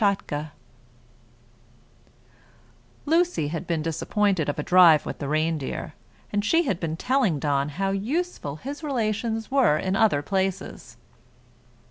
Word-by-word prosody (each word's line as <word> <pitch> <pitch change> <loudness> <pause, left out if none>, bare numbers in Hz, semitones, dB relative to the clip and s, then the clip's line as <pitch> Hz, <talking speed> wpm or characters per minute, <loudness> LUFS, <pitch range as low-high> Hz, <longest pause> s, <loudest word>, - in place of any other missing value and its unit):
_] 160 -7 0 2.6
LUCY 330 - +1
had 165 +3 -5
been 165 -3 -1
disappointed 165 +1 0
of 145 - -3
a 150 - -2
drive 175 -4 +6
with - - -6
the 140 - -4
reindeer, 155 -2 -2 0.4
and 205 0 +1
she 330 +11 +3
had 200 - -1
been 160 -1 -3
telling 250 - +1
Don 140 0 0
how 195 +6 -2
useful 220 - -2
his 280 - -7
relations 225 -4 -2
were 265 - +4
in 185 +4 -1
other 195 -10 +3
places. 190 +1 -3
190 Hz, 125 wpm, -25 LUFS, 155-225 Hz, 2.6 s, drive